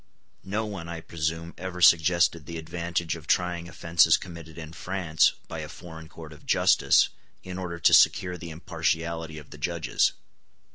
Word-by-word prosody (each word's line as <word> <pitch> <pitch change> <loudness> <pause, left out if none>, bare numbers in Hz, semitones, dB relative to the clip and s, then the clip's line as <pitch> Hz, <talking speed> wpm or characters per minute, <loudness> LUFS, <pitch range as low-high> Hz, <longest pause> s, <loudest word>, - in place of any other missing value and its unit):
No 105 +3 -2
one, 95 -6 -6
I 85 -1 -5
presume, 80 +1 -4
ever 90 0 -6
suggested 85 -1 +4
the 85 - -6
advantage 85 +1 -3
of 80 -1 -12
trying 90 -1 0
offences 85 -1 +3
committed 85 -2 -10
in 80 -1 -8
France 90 -3 +1
by - - -6
a - - -6
foreign 80 -2 -11
court 80 -2 -11
of 75 - -16
justice, - - +4 0.3
in 90 0 -6
order 85 -2 -5
to 85 - +4
secure 90 -1 +5
the 85 -1 -8
impartiality 80 0 -3
of 75 - -12
the - - -11
judges. - - 0
85 Hz, 160 wpm, -26 LUFS, 80-90 Hz, 0.3 s, secure